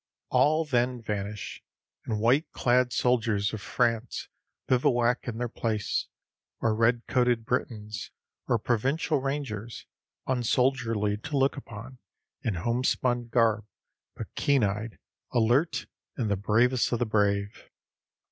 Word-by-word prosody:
All 155 +2 +3
then 125 -3 +1
vanish, 105 -2 -5 0.4
and 110 -2 -2
white 125 +9 +3
clad 125 0 +2
soldiers 115 -5 +1
of 110 - -4
France 115 +1 -1 0.4
bivouac 120 -1 +2
in 115 -2 -3
their 120 +1 -1
place 110 -3 -2 0.5
or 115 - +2
red 115 +2 +2
coated 120 -3 +2
Britons, 105 -5 -3 0.4
or 120 - +3
Provincial 135 +7 0
rangers, 130 -5 -4 0.4
unsoldierly 120 -4 +1
to 140 +7 -3
look 135 +1 +3
upon, 125 -1 -9 0.4
in 110 - -1
home 120 +8 -1
spun 120 -2 +1
garb, 115 -3 +2 0.5
but - - -8
keen 140 -4 +2
eyed, 105 +3 -2 0.4
alert, 120 +8 +2 0.3
and 115 -6 -1
the - - +3
bravest 115 +6 +2
of 120 - +2
the 120 - 0
brave. 100 -1 0
120 Hz, 125 wpm, -28 LUFS, 110-125 Hz, 0.5 s, All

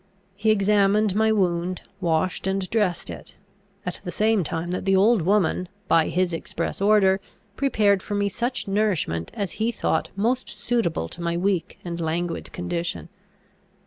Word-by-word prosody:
He 210 +2 0
examined 205 0 +3
my 220 +2 +3
wound, 180 -3 0 0.2
washed 175 +1 0
and 190 -1 -1
dressed 205 -6 0
it; - - -10 0.5
at 180 - -4
the 180 - -5
same 215 +2 +2
time 165 +3 -3
that 180 - -2
the 195 0 +3
old 210 +2 +4
woman, 185 0 +1 0.2
by 165 -1 +4
his 180 -1 0
express 165 +2 -3
order, 200 -2 +4 0.4
prepared 210 -8 +2
for 205 - -4
me 205 0 +1
such 245 +4 -2
nourishment 190 - 0
as 200 -3 -2
he 230 +2 +2
thought - - -1
most 240 +6 0
suitable 170 - -1
to 175 - -8
my 170 0 -1
weak 180 -2 -1
and 170 -1 -4
languid 165 +1 -2
condition. 175 -1 -3
190 Hz, 155 wpm, -24 LUFS, 175-210 Hz, 0.5 s, old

